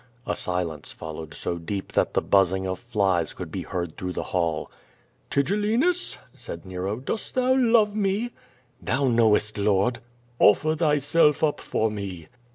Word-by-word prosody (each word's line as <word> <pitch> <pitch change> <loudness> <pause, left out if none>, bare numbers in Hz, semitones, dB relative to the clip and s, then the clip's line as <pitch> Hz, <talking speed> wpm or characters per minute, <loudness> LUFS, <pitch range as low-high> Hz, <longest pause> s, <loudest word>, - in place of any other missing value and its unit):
A - - -1
silence 85 -5 -2
followed 80 -1 -8
so 85 - -2
deep 95 +4 -5
that - - +1
the - - +2
buzzing 95 -1 +3
of 95 0 -3
flies 100 -9 0
could - - -7
be - - -3
heard 85 -3 -4
lli 90 - -3
rough 90 - -4
the - - -2
hall. 85 -4 -1 0.6
"Tigellinus!" 215 - +1 0.2
said - - -8
Nero, 95 +2 -3
"dost 135 - -5
thou 255 0 +3
love 225 -5 +4
me?" 210 +3 0 0.5
"Thou 135 +1 0
knowest. 110 -2 +3
Lord." 100 +4 +2 0.4
"Offer 155 +9 +5
thyself 150 0 +3
up 150 -2 +2
for 110 0 -1
me." 95 -6 -6
105 Hz, 155 wpm, -25 LUFS, -, 0.6 s, Offer